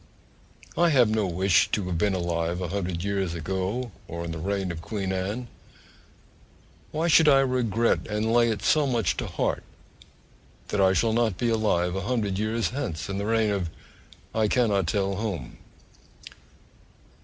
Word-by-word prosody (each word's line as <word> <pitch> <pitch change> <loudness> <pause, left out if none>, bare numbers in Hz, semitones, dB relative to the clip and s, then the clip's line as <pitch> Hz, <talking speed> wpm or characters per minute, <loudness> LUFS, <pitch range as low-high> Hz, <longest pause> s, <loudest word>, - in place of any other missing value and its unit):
I 170 0 +4
have 125 -7 +4
no 110 -2 +1
wish 95 +2 +3
to 105 - 0
have 90 -2 -2
been 100 -1 +2
alive 85 -1 -1
a 90 -2 -3
hundred 90 -3 -3
years 95 -3 -1
ago, 95 +8 -3 0.2
or 85 +1 -5
in 85 - -4
the 80 - -5
reign 95 +1 -2
of 85 -1 -6
Queen 95 +2 -3
Anne: 100 +7 -3 1.4
why 160 +2 -1
should 160 -2 +6
I 135 -1 +6
regret 120 -4 +1
and 110 +1 -1
lay 120 0 +4
it 105 -3 -2
so 150 +4 +3
much 120 -4 +1
to - - -3
heart - - -1 1.1
that 105 - 0
I 95 0 +5
shall 110 +3 +2
not 115 -5 +1
be 120 - 0
alive 95 -6 +1
a 95 - -2
hundred 105 -3 -1
years 110 -2 0
hence, 105 - -4
in 100 0 -2
the 100 - -2
reign 110 -1 +2
of 95 -4 -1 0.6
I 110 -1 +2
cannot 105 -7 +2
tell 100 +1 0
whom? 100 - -4
100 Hz, 165 wpm, -26 LUFS, 90-115 Hz, 1.4 s, should